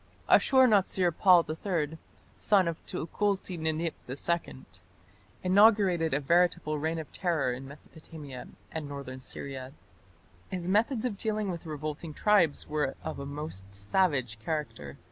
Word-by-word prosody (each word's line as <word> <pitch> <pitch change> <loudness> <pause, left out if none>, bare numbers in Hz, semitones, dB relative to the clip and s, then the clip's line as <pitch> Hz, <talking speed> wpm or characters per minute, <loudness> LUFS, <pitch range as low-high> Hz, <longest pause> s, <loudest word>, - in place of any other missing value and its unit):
Ashur 260 -1 +6
natsir 190 -4 +3
pal 180 -3 +6
III, 160 -1 -2 0.4
son 195 -4 +3
of 165 -1 -4
Tukulti 195 +2 -2
Ninip 160 0 -1 0.2
II, 145 +1 -3 0.8
inaugurated 190 -4 +4
a - - +2
veritable 170 0 +2
reign 160 +2 -1
of 160 -2 -6
terror 165 -9 0
in 130 +2 -7
Mesopotamia 145 -1 -10 0.2
and 155 -2 -4
northern 140 -2 -7
Syria. 130 0 -6 0.8
His 180 -2 -4
methods 220 +5 +2
of 210 -6 -3
dealing 215 -3 -1
with 170 -1 -7
revolting 155 +1 -5
tribes 200 -8 +3
were 150 -3 -1
of - - -5
a 140 - -5
most 140 -10 -6
savage 125 - +1
character. 125 - -4
160 Hz, 130 wpm, -29 LUFS, 140-185 Hz, 0.8 s, Ashur